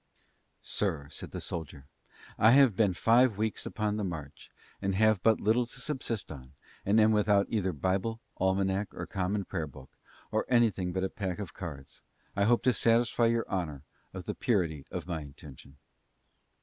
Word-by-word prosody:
"Sir," 80 -8 -2
said - - -7
the - - -6
soldier, 75 -4 -6 0.5
"I 110 +2 +7
have 135 -6 +6
been 100 -4 +2
five 115 +1 +4
weeks 110 0 -2
upon 105 -1 -1
the 105 - -2
march, 80 -7 -6 0.3
and 100 -1 0
have 110 -1 +3
but 110 +2 +4
little 115 +3 +2
to 125 - -9
subsist 125 - -3
on, 65 -2 -10 0.3
and 105 +3 +3
am 110 0 +5
without 105 -1 +3
either 95 -4 0
Bible, 95 +8 -1 0.2
Almanack, 95 +2 0
or - - -4
Common 100 +1 -2
Prayer 80 -5 -3
book, 65 -1 -13 0.4
or - - +1
anything 110 -7 +2
but 95 +1 -2
a 95 - 0
pack 95 -2 -4
of 100 -4 -6
cards. 70 -7 -8 0.3
I 100 0 +2
hope 120 +2 +3
to 125 +1 +4
satisfy 115 0 +3
your 115 0 +1
honor 80 -8 -3 0.3
of 95 -1 -7
the - - -3
purity 85 - -1
of 90 -3 -5
my 85 -3 -3
intention." 70 -1 -13
100 Hz, 175 wpm, -30 LUFS, 85-110 Hz, 0.5 s, I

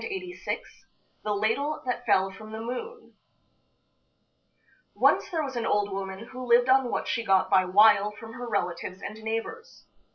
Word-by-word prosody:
THE 375 -5 -4 0.7
LADLE 225 +9 0
THAT 250 -1 -3
FELL 190 0 +3
FROM 215 +2 -11
THE 220 - -6
MOON 255 - -6 1.8
Once - - +3
there 330 -5 -1
was 270 -3 -5
an 235 -1 -1
old 205 -1 +1
woman 195 +3 -6
who 255 0 -7
lived 245 +1 +5
on 260 -1 +4
what - - -2
she 230 - -1
got 195 -3 +2
by 185 -1 +5
wile 205 +2 +5
from 225 +2 -11
her 245 -1 -6
relatives 185 -2 -2
and 215 +1 -7
neighbors. 225 - -5
225 Hz, 155 wpm, -27 LUFS, 200-260 Hz, 1.8 s, lived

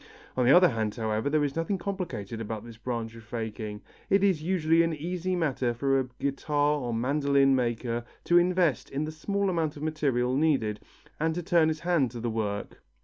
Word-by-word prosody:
On 125 -1 +2
the - - +7
other 180 +3 +7
hand, 110 -4 -2
however, 110 +2 -1
there 150 0 +2
is 140 -2 -1
nothing 165 +4 -1
complicated 170 - -4
about 110 0 -5
this 115 -1 -10
branch 115 -1 -4
of 115 -1 -12
faking. 110 -2 -5 0.3
It 195 0 +4
is 190 -6 +3
usually 165 -1 +2
an 165 -1 +1
easy 180 +4 -2
matter 135 -8 0
for 135 +2 +2
a 130 - -2
guitar 145 +1 0
or 120 -3 -3
mandoline 140 +3 +2
maker 120 -1 -1 0.2
to 175 0 +5
invest 175 -5 +1
in 140 +2 -2
the 155 - -5
small 200 +6 -1
amount 165 -5 -1
of 145 - -7
material 135 -5 0
needed, 135 -8 +1 0.4
and 160 +1 0
to 175 - -3
turn 170 -2 +4
his 155 -1 -2
hand 170 -7 +2
to 120 +1 -8
the 120 0 -2
work. 105 -2 -3
140 Hz, 200 wpm, -28 LUFS, 115-165 Hz, 0.4 s, the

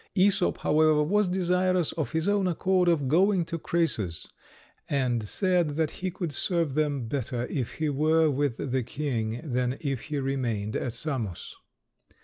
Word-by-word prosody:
Æsop, 190 -1 +3
however, 155 0 +3
was 200 +4 +2
desirous 180 -1 +1
of 150 -7 -4
his 160 +3 0
own 200 -2 +2
accord 180 +1 +1
of 160 -6 +2
going 180 +4 +3
to 165 0 -4
Crœsus, 115 - -1 0.6
and 125 -4 +1
said 175 - 0
that 155 -1 0
he 185 - 0
could 175 -4 -4
serve 165 -1 -1
them 145 -5 0
better 125 -1 -2
if 130 -5 -2
he 155 - -2
were 155 +3 +3
with 140 -2 -1
the 130 0 +1
king 120 -3 -3
than 125 -2 -1
if 135 -5 -3
he 150 -1 -3
remained 120 -6 -2
at 120 - -2
Samos. 115 - -4
150 Hz, 155 wpm, -27 LUFS, 130-175 Hz, 0.6 s, Æsop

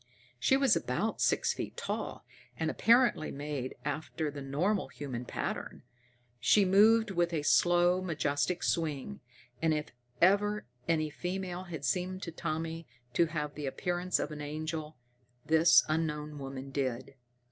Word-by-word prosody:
She 265 - +4
was 270 -4 +4
about - - -1
six - - +2
feet - - -6
tall, - - -4 0.3
and - - 0
apparently 235 -8 +3
made 140 -2 -4
after 150 +1 -3
the 145 0 -7
normal 170 +10 0
human 125 -4 -6
pattern. - - -4 0.6
She 160 - +5
moved 215 +3 +5
with 175 -2 +1
a 155 -3 -1
slow, 175 +3 +4
majestic 160 0 -1
swing, 160 +4 -1 0.4
and 160 -1 +3
if 150 0 -4 0.3
ever 205 +3 +3 0.2
any 155 -2 +1
female 180 +1 -4
had 160 -6 -6
seemed 185 +1 -1
to 170 - -4
Tommy 165 0 -4 0.3
to 170 - +3
have 150 -2 -3
the 150 -2 -5
appearance 180 +5 -1
of 145 - -3
an 150 -1 -6
angel, 155 +1 -4 0.5
this 160 +1 +6
unknown 150 -2 -2
woman 135 0 -7
did. 130 -1 -2
160 Hz, 140 wpm, -31 LUFS, 145-180 Hz, 0.6 s, this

